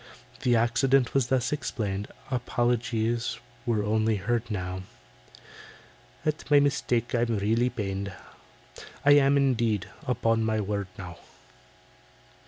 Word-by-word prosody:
The 120 -1 +3
accident 125 +3 +3
was 135 -3 +2
thus 130 +2 +1
explained, 105 -8 -3 0.2
Apologies 120 -2 0 0.3
were 110 -3 +1
only 110 +1 +1
heard 115 +4 -1
now: 95 -3 -3 1.4
"At 155 -1 -2
my 145 -1 +7
mistake 125 -4 0
I'm 115 -2 +1
really 115 +5 +2
pained— 100 -4 -3 0.9
I 145 - +7
am, 140 -1 +6
indeed—upon 115 -2 0
my 110 0 +1
word 100 -1 -2
now. 90 -2 -8
115 Hz, 105 wpm, -27 LUFS, 105-125 Hz, 1.4 s, my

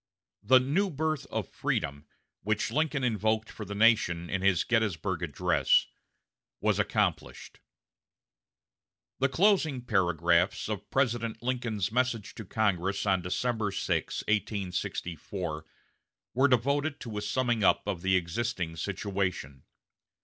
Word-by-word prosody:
The 130 +6 +6
"new 155 +11 +1
birth 155 -1 -2
of - - -3
freedom" 70 +1 -3 0.3
which 110 +2 -1
Lincoln 150 -2 0
invoked 110 -1 0
for 110 - -7
the 100 +1 -6
nation 100 -6 +3
in 95 - -1
his 95 -3 +3
Gettysburg 110 -8 0
address, - - +2 0.7
was - - +1
accomplished. - - -1 1.6
The 135 - +2
closing 160 - +2
paragraphs 90 -3 +2
of 105 -3 -5
President 115 -4 0
Lincoln's 120 -5 -1
message 125 -3 -1
to 110 - -8
Congress 100 -2 0
of 95 -2 +2
December 105 +4 -1
6, 95 - -1
1864, 90 -5 -3 0.7
were 130 +3 +4
devoted 140 +4 +1
to 110 -3 -5
a - - -5
summing 120 0 0
up - - +3
of 100 -4 -3
the 95 0 +2
existing 90 -1 -2
situation. 95 -7 -3
105 Hz, 120 wpm, -29 LUFS, 95-125 Hz, 1.6 s, The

